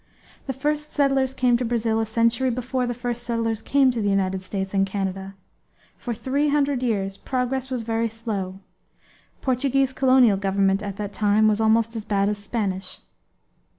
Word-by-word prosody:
The 265 - -1
first 300 +3 -2
settlers 270 -2 +2
came 250 -2 +2
to 250 - -2
Brazil 225 -2 0
a 225 - -1
century 230 +3 +2
before 250 +1 -2
the 245 - -1
first 240 0 -3
settlers 230 -2 -1
came 270 -2 +3
to 235 -2 -3
the 205 - +1
United 190 -1 0
States 190 0 -4
and 195 -1 +3
Canada. 195 0 -3 0.6
For 245 - -6
three 270 +6 0
hundred 285 -3 +1
years 195 -5 -1
progress 260 +3 -2
was 250 -3 -3
very 225 0 0
slow 200 -4 -5 0.8
Portuguese 265 +1 +1
colonial 255 -6 +4
government 195 0 +1
at 200 -2 -5
that 205 -1 -5
time 210 +1 +3
was 215 0 +2
almost 225 +1 +2
as 220 - -4
bad 200 -1 +1
as 210 -1 -2
Spanish. 200 -2 -3
230 Hz, 170 wpm, -24 LUFS, 200-255 Hz, 0.8 s, colonial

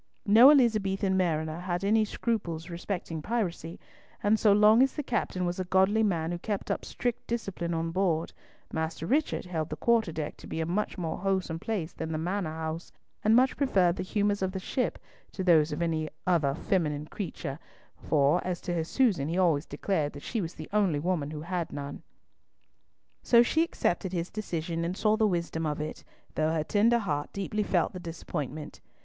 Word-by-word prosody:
No 225 +6 +8
Elizabethan 210 -8 +3
mariner 160 -3 0
had 175 0 -3
any 215 +2 +3
scruples 180 -7 -3
respecting 170 -2 -4
piracy, 175 -5 -3 0.4
and 210 +1 +3
so 210 - +5
long 210 +3 +6
as 270 0 +3
the 295 - -2
captain 205 -7 -1
was 175 +1 -2
a - - 0
godly 190 +4 +3
man 170 -6 +1
who 175 - -3
kept 205 +1 -3
up - - -2
strict 245 0 -3
discipline 190 -7 -3
on 165 0 -1
board, 170 -3 0 0.4
Master 160 0 -2
Richard 285 - 0
held 165 -3 -3
the - - -3
quarterdeck 180 -10 0
to - - -12
be - - -4
a 160 - 0
much 190 +6 -2
more 170 -3 -3
wholesome 190 -4 -1
place 180 -5 -3
than 160 0 -5
the - - -1
Manor 180 +2 -2
house, 160 +1 -5 0.3
and 215 +1 +5
much 255 +2 +4
preferred 190 -11 +2
the - - -4
humours 205 +1 0
of 190 0 -1
the 190 - -3
ship 250 +7 -1 0.4
to 190 - -3
those 160 -4 +4
of 150 +3 -2
any 160 -2 -1 0.2
other 155 -6 +2
feminine 155 -6 -1
creature; 155 -5 -5 0.4
for, 145 +3 +2
as 180 -1 -2
to 175 - -3
his 165 -2 -1
Susan, 195 - +2
he 170 +3 -2
always 165 -5 +2
declared 155 -7 -1
that 145 - -10
she 230 - -2
was 165 -2 -5
the 155 - -8
only 195 -8 +2
woman 155 -2 -1
who 150 -1 -6
had 170 0 -3
none. 145 0 -6 1.2
So 235 -1 +6
she 315 +6 +2
accepted 190 - -1
his 170 0 -2
decision, 170 -5 -3
and 175 +3 -2
saw 215 0 +3
the 220 -1 +3
wisdom 170 -3 -1
of 150 0 -2
it, 150 +1 -5 0.3
though 155 0 +1
her 160 -2 0
tender 220 +7 +3
heart 150 -10 -2
deeply 200 +2 -2
felt 185 -4 +1
the 185 - -6
disappointment. 155 -3 -6
180 Hz, 190 wpm, -29 LUFS, 160-205 Hz, 1.2 s, No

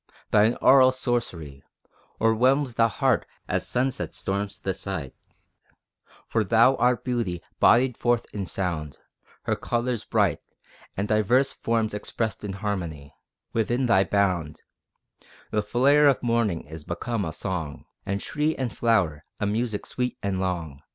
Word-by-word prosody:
Thine 110 +3 +4
aural 130 -1 +7
sorcery 115 - -3 0.6
O'erwhelms 125 +4 +3
the 115 0 +4
heart 110 - +1 0.2
as - - -1
sunset 130 +2 -1
storms 100 0 -3
the 95 0 -3
sight, 90 -8 -5 1.1
For 110 - 0
thou 115 +6 +4
art 125 -1 +2
Beauty 115 -9 -2 0.2
bodied 125 +1 +5
forth 120 -1 +1
in 100 -3 -3
sound 85 -7 -2 0.5
Her - - 0
colors 120 -1 -2
bright - - +1 0.6
And 100 +2 -1
diverse 120 +6 +2
forms 115 -2 -1
expressed 110 +2 -3
in 100 -2 -4
harmony: 85 -8 -4 0.4
Within 120 +3 +1
thy 95 -5 +4
bound, 95 -6 0 0.9
The 105 - +1
flare 140 +7 +4
of 135 -3 +2
morning 115 -8 +1
is 80 +1 -9
become 100 +7 -3
a 80 - -3
song, 80 -4 -4 0.2
And 100 +1 -2
tree 150 +8 -1
and 125 -5 -3
flower 95 -10 +1 0.2
a - - 0
music 110 +1 -1
sweet 125 0 -3
and 100 -2 -1
long. 85 -7 -3
105 Hz, 140 wpm, -25 LUFS, 95-120 Hz, 1.1 s, aural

